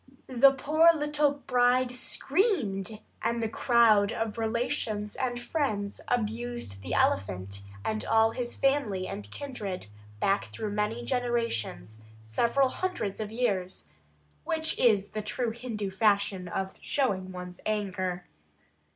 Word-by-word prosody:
The 260 Hz, +2 st, +6 dB
poor 305 Hz, +5 st, +4 dB
little 295 Hz, -1 st, +1 dB
bride 250 Hz, 0 st, +3 dB
screamed, 250 Hz, -, 0 dB, 0.2 s
and 235 Hz, 0 st, 0 dB
the 225 Hz, -, 0 dB
crowd 225 Hz, -3 st, +4 dB
of 225 Hz, 0 st, -3 dB
relations 220 Hz, -2 st, -1 dB
and 245 Hz, -2 st, -2 dB
friends 220 Hz, -8 st, -2 dB
abused 235 Hz, -, -2 dB
the 90 Hz, -2 st, -3 dB
elephant 95 Hz, +1 st, 0 dB, 0.2 s
and 215 Hz, 0 st, -1 dB
all 225 Hz, 0 st, +4 dB
his 240 Hz, 0 st, -4 dB
family 255 Hz, -10 st, +1 dB
and 105 Hz, -, -6 dB
kindred 210 Hz, -, -5 dB, 0.3 s
back 195 Hz, -, +2 dB
through 215 Hz, -2 st, -5 dB
many 210 Hz, +3 st, -1 dB
generations, 230 Hz, -, -1 dB, 0.2 s
several 235 Hz, -, +2 dB
hundreds 360 Hz, -, -3 dB
of 215 Hz, -1 st, -3 dB
years, 200 Hz, -6 st, -1 dB, 0.5 s
which 320 Hz, -1 st, 0 dB
is 205 Hz, -5 st, +4 dB
the 215 Hz, -, -4 dB
true 230 Hz, +2 st, -2 dB
Hindu 225 Hz, -4 st, -4 dB
fashion 200 Hz, -2 st, +2 dB
of 190 Hz, +2 st, -3 dB
showing 195 Hz, -9 st, 0 dB
one's 180 Hz, -1 st, -8 dB
anger. 185 Hz, -4 st, -2 dB
220 Hz, 125 wpm, -29 LUFS, 195-250 Hz, 0.5 s, The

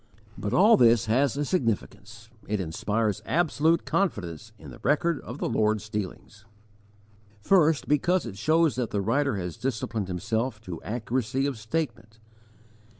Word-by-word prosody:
But 105 Hz, -, -4 dB
all 210 Hz, +6 st, +6 dB
this 120 Hz, -2 st, +5 dB
has 125 Hz, +3 st, +1 dB
a 145 Hz, -, 0 dB
significance. 115 Hz, -, -3 dB, 0.2 s
It 105 Hz, 0 st, -1 dB
inspires 105 Hz, +5 st, -1 dB
absolute 165 Hz, -1 st, +1 dB
confidence 105 Hz, -, -2 dB
in -, -, -11 dB
the -, -, -12 dB
record 165 Hz, +1 st, +1 dB
of 120 Hz, -, -8 dB
the -, -, -2 dB
Lord's 110 Hz, -1 st, 0 dB
dealings. 105 Hz, 0 st, -6 dB, 1.0 s
First, 160 Hz, -, +3 dB
because 175 Hz, +4 st, +2 dB
it 110 Hz, -5 st, -7 dB
shows 155 Hz, +7 st, +2 dB
that 125 Hz, -3 st, -1 dB
the 100 Hz, -, -1 dB
writer 115 Hz, +4 st, +1 dB
has 90 Hz, -3 st, -5 dB
disciplined 110 Hz, -5 st, -3 dB
himself 110 Hz, +6 st, -2 dB
to 90 Hz, -6 st, -7 dB
accuracy 125 Hz, +3 st, -2 dB
of 140 Hz, -2 st, -1 dB
statement. 115 Hz, -2 st, -4 dB
115 Hz, 145 wpm, -26 LUFS, 105-145 Hz, 1.0 s, all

